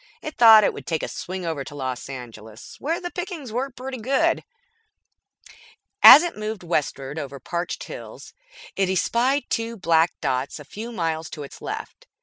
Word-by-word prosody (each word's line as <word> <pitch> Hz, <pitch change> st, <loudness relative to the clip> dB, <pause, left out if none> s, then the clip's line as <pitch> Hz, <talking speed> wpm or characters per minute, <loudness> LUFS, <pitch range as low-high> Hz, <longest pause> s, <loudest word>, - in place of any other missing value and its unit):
It 310 Hz, -, -6 dB
thought 225 Hz, -2 st, +8 dB
it -, -, +2 dB
would -, -, -10 dB
take 160 Hz, -2 st, -1 dB
a -, -, -2 dB
swing 185 Hz, 0 st, -6 dB
over 160 Hz, -4 st, -3 dB
to 145 Hz, -, -10 dB
Los 130 Hz, -2 st, -5 dB
Angeles, 115 Hz, -4 st, -10 dB
where 325 Hz, +4 st, -2 dB
the 350 Hz, -1 st, -6 dB
pickings 350 Hz, -, -6 dB
were 255 Hz, +4 st, -2 dB
pretty 260 Hz, 0 st, -7 dB
good. 265 Hz, +5 st, +1 dB, 1.6 s
As 305 Hz, -, +11 dB
it 345 Hz, -, -3 dB
moved 215 Hz, -2 st, -5 dB
westward 150 Hz, -3 st, -2 dB
over 140 Hz, -2 st, -7 dB
parched 170 Hz, +6 st, -4 dB
hills, -, -, -10 dB, 0.4 s
it 195 Hz, -1 st, +1 dB
espied 245 Hz, +9 st, +1 dB
two 230 Hz, 0 st, -2 dB
black 165 Hz, -2 st, +2 dB
dots 130 Hz, +3 st, -2 dB
a 150 Hz, -, -11 dB
few 220 Hz, -, -8 dB
miles 165 Hz, -6 st, -2 dB
to 150 Hz, -, -7 dB
its 140 Hz, -, -11 dB
left. -, -, -7 dB
180 Hz, 170 wpm, -23 LUFS, 145-240 Hz, 1.6 s, As